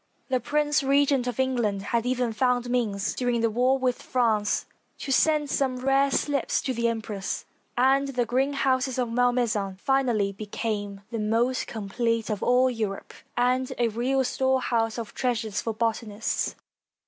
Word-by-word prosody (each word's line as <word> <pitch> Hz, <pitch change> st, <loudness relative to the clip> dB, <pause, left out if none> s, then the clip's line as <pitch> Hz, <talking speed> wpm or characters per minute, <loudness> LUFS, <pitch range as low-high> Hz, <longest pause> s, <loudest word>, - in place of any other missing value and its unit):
The 255 Hz, -1 st, +2 dB
Prince 295 Hz, +4 st, +1 dB
Regent 275 Hz, -2 st, +2 dB
of 245 Hz, 0 st, -3 dB
England 235 Hz, -7 st, 0 dB
had 235 Hz, +1 st, +1 dB
even 250 Hz, -2 st, 0 dB
found 250 Hz, +1 st, +1 dB
means, 210 Hz, -5 st, 0 dB
during 245 Hz, -2 st, 0 dB
the 230 Hz, -1 st, +2 dB
war 250 Hz, +4 st, +3 dB
with 255 Hz, -2 st, -1 dB
France, 220 Hz, -5 st, +1 dB, 0.3 s
to 275 Hz, -, -5 dB
send 300 Hz, +2 st, +3 dB
some 265 Hz, -2 st, 0 dB
rare 270 Hz, +2 st, +2 dB
slips 280 Hz, 0 st, 0 dB
to 260 Hz, -, -1 dB
the 235 Hz, -1 st, 0 dB
em 230 Hz, -1 st, -1 dB
press, 200 Hz, -2 st, -4 dB, 0.3 s
and 270 Hz, +2 st, +3 dB
the 250 Hz, -3 st, -1 dB
greenhouses 260 Hz, +1 st, +1 dB
of 245 Hz, -2 st, -1 dB
Malmaison 240 Hz, -5 st, +1 dB
finally 240 Hz, -4 st, +1 dB
became 205 Hz, 0 st, -4 dB
the 230 Hz, -, -3 dB
most 230 Hz, +4 st, +1 dB
complete 230 Hz, +1 st, -2 dB
of 210 Hz, -, -3 dB
all 250 Hz, +1 st, +4 dB
Europe, 220 Hz, -5 st, -3 dB, 0.2 s
and 250 Hz, +1 st, +1 dB
a 240 Hz, -1 st, +2 dB
real 255 Hz, +4 st, 0 dB
storehouse 250 Hz, -3 st, 0 dB
of 230 Hz, -2 st, -6 dB
treasures 225 Hz, -5 st, -1 dB
for 225 Hz, -, -2 dB
botanists. 225 Hz, -1 st, -2 dB
245 Hz, 155 wpm, -26 LUFS, 225-260 Hz, 0.3 s, all